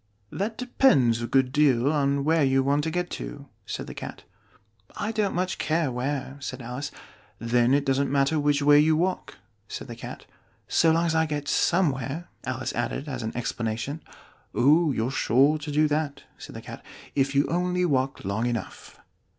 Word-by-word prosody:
"That 215 +3 -3
depends 135 - +3
a 120 - -2
good 130 0 +2
deal 140 -2 +3
on 140 -1 +1
where 160 +1 +3
you 135 0 +3
want 140 +2 +1
to - - 0
get 180 +2 -2
to," - - -7 0.2
said - - -4
the - - -8
Cat. - - -8 0.7
"I 210 +1 -2
don't 215 -3 -1
much 185 +1 -1
care 160 -3 0
where 135 +2 -3
" - - -17
said 130 - -6
Alice. 125 +4 -5 0.5
"Then 120 +2 +2
it 140 0 +1
doesn't 135 0 +1
matter 140 +2 +2
which 145 0 +2
way 145 0 +7
you 155 +1 +4
walk," 180 +4 -2 0.3
said - - -7
the - - -7
Cat. - - -9 0.3
" - - -38
so 165 - +3
long 165 +1 +2
as 165 - +1
I 160 0 +2
get 145 -1 -3
somewhere," 155 -2 0 0.2
Alice 130 0 -3
added 120 +4 -3
as 130 -4 -4
an 110 +1 -4
explanation. 120 +5 -3 0.5
"Oh, 155 +4 +4
you're 120 0 -1
sure 140 +4 +3
to 150 0 -6
do 150 +1 +3
that," 150 -1 -2
said - - -11
the - - -7
Cat, - - -9 0.3
"if 135 0 0
you 140 - +4
only 180 +1 0
walk 135 - 0
long 105 +5 -1
enough." 120 -2 -5
145 Hz, 190 wpm, -26 LUFS, 130-160 Hz, 0.7 s, way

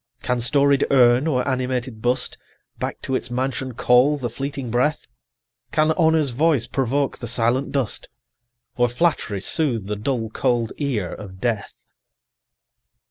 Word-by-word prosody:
40 - - -14
Can 125 -1 +1
storied 140 +2 +3
urn 125 +1 +5
or 125 -4 0
animated 130 -3 -2
bust 125 +1 0 0.4
Back - - -4
to 130 - -3
its 125 -2 -1
mansion 130 0 -2
call 125 +5 +4
the 120 -5 -4
fleeting 135 -2 -5
breath? 130 +6 +1 0.7
Can 155 0 +3
Honour's 160 -4 +3
voice 140 -1 +2
provoke 135 +2 -1
the 120 - -5
silent 120 +3 0
dust? 135 -6 -2 0.7
Or 120 0 +3
Flattery 120 - 0
soothe 120 - 0
the 105 +1 -3
dull 115 +1 -2
cold 115 0 0
ear 120 - -1
of 95 -3 -10
Death? 110 -2 -3
125 Hz, 140 wpm, -22 LUFS, 120-140 Hz, 0.7 s, urn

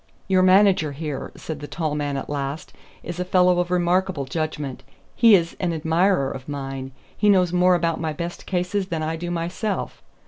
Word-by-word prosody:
"Your 190 -1 +3
manager 185 -5 +4
here," 150 -1 -5
said 160 -3 -6
the 145 - -7
tall 155 -2 -2
man 145 -2 -2
at 135 - -5
last, 145 +3 -4 0.3
"is 175 0 -6
a - - +1
fellow 180 -1 +3
of 175 0 0
remarkable 180 -3 +1
judgment. 150 -2 -4 0.3
He 230 -3 +7
is 170 -2 0
an 175 -2 0
admirer 160 -1 +1
of 130 +2 -8
mine. 135 -2 -5 0.2
He 210 - +2
knows 180 -3 +4
more 180 0 +4
about 165 -2 0
my 160 -1 -1
best 170 +3 -6
cases 185 +1 -1
than 165 -4 -3
I 160 +1 -2
do 175 +2 -5
myself. 175 +5 -3
170 Hz, 185 wpm, -23 LUFS, 150-180 Hz, 0.3 s, He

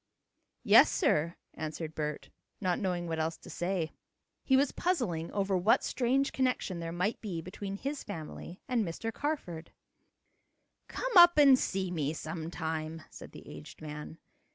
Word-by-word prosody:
"Yes, - - +7
sir," 170 - +1 0.2
answered 155 0 -5
Bert, 150 -1 -4 0.3
not 180 -3 0
knowing 180 -3 -1
what 160 -1 -2
else 160 +1 -1
to - - -12
say. 175 -3 -2 0.5
He 265 - +4
was 275 0 +3
puzzling 220 - -1
over 195 -1 0
what 185 +5 +3
strange 265 +2 +1
connection 250 -8 -1
there 165 0 -4
might 180 +6 -1
be 190 -7 -4
between 195 +3 -6
his 280 +7 -4
family 175 -1 -8
and 245 -3 +1
Mr. 210 +6 -4
Carford. 180 - -4 1.2
"Come - - -3
up 345 -1 +9
and 275 -3 +7
see 190 -1 -1
me 155 -3 -1
sometime," 160 0 -4
said - - -11
the - - -12
aged 75 0 -11
man. 150 +1 -7
180 Hz, 150 wpm, -31 LUFS, 160-240 Hz, 1.2 s, up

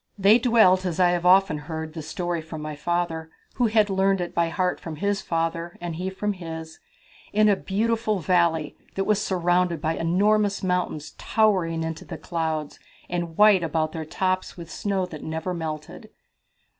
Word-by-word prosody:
"They 205 +4 +6
dwelt 220 -7 +5
as 180 -2 -3
I 180 -1 +5
have 175 0 0
often 185 -4 +5
heard 160 +1 -6
the 160 - -6
story 175 +2 -3
from 160 0 -8
my 150 0 -5
father, 165 +1 -2 0.3
who 245 -2 +3
had 215 -1 +3
learned 195 0 +2
it 175 -1 -4
by 170 -1 +1
heart 180 +1 -1
from 165 -2 -7
his 200 +5 -1
father, 165 +1 -2
and 175 -2 -5
he 180 +3 -3
from 205 +2 -2
his 160 -3 -8 0.5
in 215 +1 +4
a 205 - +5
beautiful 215 +2 0
valley 170 -3 +1 0.2
that 195 - 0
was 210 0 +1
surrounded 175 -3 +1
by 160 +2 -1
enormous 200 +4 +2
mountains 180 -5 -1
towering 185 -7 +1
into 160 0 -4
the - - -7
clouds 160 -3 -3 0.3
and 170 -2 -3
white 210 -3 +6
about 160 -1 -1
their 160 0 -5
tops 185 +4 -2
with 170 -1 -9
snow 195 -3 -1
that 160 -4 -9
never 160 +3 -3
melted. 155 -3 -6
175 Hz, 175 wpm, -25 LUFS, 160-195 Hz, 0.5 s, They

